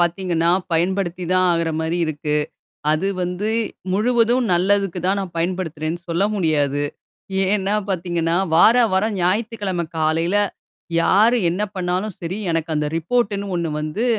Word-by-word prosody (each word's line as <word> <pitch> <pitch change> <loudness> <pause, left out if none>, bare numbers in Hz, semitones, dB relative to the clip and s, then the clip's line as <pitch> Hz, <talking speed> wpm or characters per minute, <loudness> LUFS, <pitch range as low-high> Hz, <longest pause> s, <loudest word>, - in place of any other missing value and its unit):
பாத்தீங்கன்னா 175 -1 +1 0.2
பயன்படுத்தி 180 +1 0
தான் 185 0 +4
ஆகுற 165 -1 0
மாரி 160 +2 -1
இருக்கு. 150 -1 -2 0.6
அது 155 +5 +1
வந்து 180 +4 -2 0.4
முழுவதும் 235 +3 +2
நல்லதுக்கு 190 0 +1
தான் 195 +2 +2
நான் 185 -3 -5
பயன்படுத்துறேன்னு 170 -2 -2
சொல்ல 170 +4 +1
முடியாது. 145 -5 +1 0.7
ஏன்னா 205 0 +1
பாத்தீங்கன்னா, 175 -2 0 0.2
வார, 220 +7 +7 0.2
வர 190 +3 +2
ஞாயித்திக்கிழமை 195 -2 -1
காலையில, 165 +4 +1 0.7
யாரு 225 +8 +4
என்ன 180 +4 -2
பண்ணாலும் 185 +2 -2
சரி, 175 +4 -4
எனக்கு 165 0 -1
அந்த 150 0 0
ரிப்போர்ட்டன்னு 200 +1 -1
ஒண்ணு 170 -2 -2
வந்து 155 +10 -2
180 Hz, 125 wpm, -21 LUFS, 165-200 Hz, 0.7 s, வார